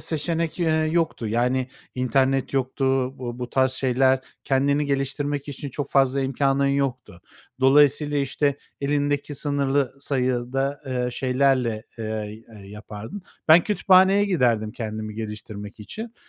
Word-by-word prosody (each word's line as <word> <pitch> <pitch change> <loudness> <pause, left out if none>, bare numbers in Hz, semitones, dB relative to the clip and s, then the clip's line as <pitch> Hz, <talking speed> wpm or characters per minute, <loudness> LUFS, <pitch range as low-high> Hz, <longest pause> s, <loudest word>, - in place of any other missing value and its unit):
seçenek, 165 +1 -1
eee, 165 - +2 0.2
yoktu. 165 -9 0
Yani, 125 +3 0 0.3
internet 130 +2 +1
yoktu, 135 0 -1 0.3
bu 120 -1 -5
bu 125 -1 -5
tarz 130 -1 +2
şeyler, 130 0 +2 0.2
kendini 140 +2 +2
geliştirmek 140 +1 -2
için 140 0 -6
çok 145 +3 -5
fazla 135 0 +3
imkânın 135 +1 +1
yoktu. 135 -9 -2 0.4
Dolayısıyla, 145 +2 +4
işte, 140 +1 0 0.2
elindeki 145 0 0
sınırlı 140 -2 0
sayıda, 135 +1 -1
eee, 125 -1 -1
şeylerle, 125 -3 +1 0.2
eee, 110 0 -5
eee, 100 -2 -12
yapardın. 105 - -8 0.3
Ben 165 +2 +9
kütüphaneye 195 0 +4
giderdim 120 - +1
kendimi 110 -2 -5
geliştirmek 105 -1 -7
için. 225 - -7
135 Hz, 120 wpm, -24 LUFS, 120-145 Hz, 0.4 s, Ben